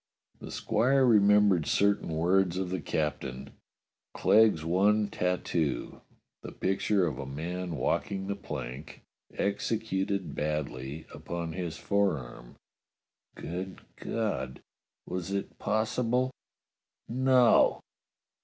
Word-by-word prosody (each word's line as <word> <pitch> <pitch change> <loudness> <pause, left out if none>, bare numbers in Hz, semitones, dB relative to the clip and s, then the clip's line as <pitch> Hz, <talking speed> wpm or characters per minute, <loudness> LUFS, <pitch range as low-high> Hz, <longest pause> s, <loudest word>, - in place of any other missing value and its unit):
The - - -9
squire 135 +3 +2
remembered 105 -6 +5
certain 100 -2 +2
words 90 +3 +2
of 95 -1 -2
the 95 -2 -2
captain: 70 -4 -3 0.6
Clegg's 105 -7 +4
one 100 +5 +3
tattoo 90 -6 -1 0.2
— - - -57
the - - -8
picture 95 0 +1
of 75 -7 -3
a 70 - -5
man 85 +5 -4
walking 95 +5 -1
the 100 +1 -2
plank, 65 -5 -7 0.3
executed 100 -4 -1
badly 75 -1 -3
upon 85 -2 -5
his 85 -2 -4
forearm. 75 -12 -1 0.8
Good 90 +3 -6
God! 110 - -3 0.4
Was 90 +1 -4
it 100 0 -4
possible.^ 115 +4 0 0.8
No! 125 0 +4
95 Hz, 100 wpm, -29 LUFS, 80-105 Hz, 0.8 s, remembered